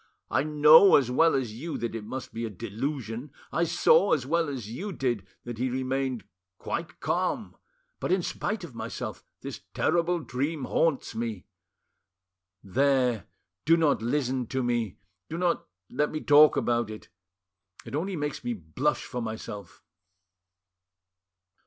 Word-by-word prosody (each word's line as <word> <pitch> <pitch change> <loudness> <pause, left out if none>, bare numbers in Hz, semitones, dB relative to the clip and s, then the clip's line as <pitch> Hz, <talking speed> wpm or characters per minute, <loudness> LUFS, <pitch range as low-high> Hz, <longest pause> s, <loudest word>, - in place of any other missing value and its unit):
I - - +3
know 150 +5 +7
as 125 -3 +3
well 165 +6 +4
as 125 -5 -1
you 155 +9 -5
that 120 -1 -3
it 115 -2 -5
must 130 +5 -6
be 115 +1 -4
a 115 - -2
delusion, 115 - -4 0.2
I 170 - +1
saw 170 +3 +4
as 135 -5 +1
well 165 +2 +1
as 130 -7 -5
you 180 - -5
did 120 - -2 0.2
that 120 -2 -7
he 130 +1 +1
remained 130 -1 -1 0.3
quite 165 -2 -5
calm, 185 +5 -1 0.4
but, - - -2
in 185 -1 +2
spite 205 +2 -3
of 165 -7 -8
myself, - - -5 0.2
this - - -7
terrible 170 +1 +2
dream 140 +2 -3
haunts 145 +2 +1
me... 110 -4 -4 1.2
.There, 125 +1 +2 0.4
do 165 +2 +5
not 155 -7 +2
listen 130 0 0
to 130 +1 -1
me, 120 -5 -1 0.3
do 165 - -4
not 175 -1 0 0.2
let 150 +3 0
me 155 - -3
talk 150 +1 +6
about 120 -2 +1
it; 110 0 -9 0.8
it - - -9
only 180 +6 -1
makes 150 -3 -3
me 120 0 -1
blush 105 - -1
for 125 -2 -4
myself." 105 -4 -7
130 Hz, 150 wpm, -28 LUFS, 120-155 Hz, 1.2 s, know